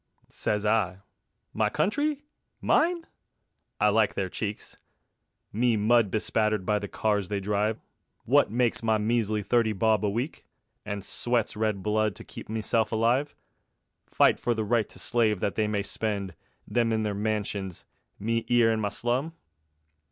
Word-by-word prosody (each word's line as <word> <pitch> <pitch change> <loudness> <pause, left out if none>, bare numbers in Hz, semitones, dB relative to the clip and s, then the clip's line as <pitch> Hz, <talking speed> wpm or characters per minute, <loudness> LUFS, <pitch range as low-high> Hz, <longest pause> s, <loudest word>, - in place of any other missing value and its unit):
Sez 105 0 -2
I: 105 -4 +1 0.6
My 110 -1 +1
Country? 290 - 0 0.4
Mine? 335 +1 +2 0.7
I 105 - +4
likes 110 0 +2
their 95 -1 -1
cheek. 105 +2 -3 0.9
Me 115 +1 +2
mud 110 0 +3
bespattered 110 -1 0
by 105 +1 +1
the 100 - -5
cars 105 -2 -1
they 100 -1 -1
drive, 105 +2 0 0.5
Wot - - +4
makes 120 +1 +1
my 110 -1 +2
measly 110 -1 0
thirty 115 +1 +2
bob 110 +1 +2
a 105 - +2
week, 120 +9 -3 0.4
And 100 -2 -4
sweats 120 -2 0
red 105 -3 -1
blood 105 -1 +1
to - - -10
keep - - -11
meself 110 0 0
alive! 120 +6 +1 0.7
Fight - - +3
for 120 - 0
the 110 - -1
right 115 -1 +1
to - - -13
slave 110 -5 +1
that 100 - -1
they 110 -1 0
may 105 -1 -1
spend, 100 -2 -3 0.3
Them 115 -1 +1
in 110 -1 +1
their 105 -1 -1
mansions, 100 -3 -3 0.3
me 115 +2 -1
'ere 120 -2 +4
in 110 - 0
my 105 -1 0
slum? 125 +9 -2
110 Hz, 155 wpm, -27 LUFS, 105-115 Hz, 0.9 s, I